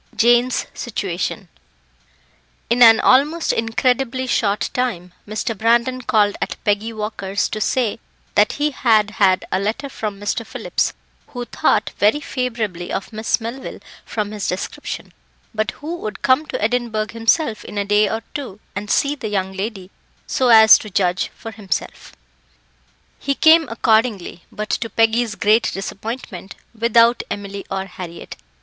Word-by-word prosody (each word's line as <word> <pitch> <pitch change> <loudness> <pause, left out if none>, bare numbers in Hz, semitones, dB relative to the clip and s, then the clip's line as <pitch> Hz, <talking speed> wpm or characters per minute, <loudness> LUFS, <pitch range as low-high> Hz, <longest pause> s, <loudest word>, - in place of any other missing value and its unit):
Jane's 240 +3 +3
Situation - - -4 1.2
In 245 +1 +2
an 225 -2 +9
almost 300 +6 +3
incredibly 250 +3 0
short 210 -4 0
time, 185 -9 -2
Mr. 220 +2 -3
Brandon 235 +4 +2
called 210 -5 +2
at - - -2
Peggy 210 +2 0
Walker's 210 -2 -2
to 215 - -4
say 230 -1 0 0.3
that 210 +1 +3
he 295 +1 0
had 220 -6 +2
had 195 -4 +2
a 185 - +1
letter 225 +8 -2
from 210 -6 -5
Mr. 205 +3 -2
Phillips, - - -2 0.3
who 245 -1 -6
thought - - +1
very 210 +8 +3
favourably 230 - -3
of 195 - -4
Miss 220 +2 0
Melville 235 +4 -6 0.3
from 210 -2 -3
his 210 -2 -4
description, 180 - -5 0.4
but 215 0 -1
who 315 +7 -6
would 215 - -7
come 275 +4 +3
to - - -4
Edinburgh 220 -1 -1
himself 230 +1 +1
in 210 - -8
a 200 - 0
day 210 0 +3
or 225 +2 -3
two 255 -9 -6 0.2
and 205 +1 -5
see 280 +4 +2
the 265 -7 -6
young 190 -2 -2
lady, 195 -1 -5 0.3
so 260 - 0
as 220 -2 +8
to 215 - -9
judge 180 -1 0
for 225 - -8
himself. 200 -3 -5 1.1
He 275 - -1
came 320 +1 +5
accordingly, 220 -5 0
but, 215 0 -5
to 230 - -1
Peggy's 225 0 +1
great 215 +3 +3
disappointment, 195 -1 -6 0.2
without 235 +1 +4
Emily 200 -1 -6
or 195 0 -3
Harriett. 175 -3 -9
220 Hz, 145 wpm, -20 LUFS, 205-245 Hz, 1.2 s, an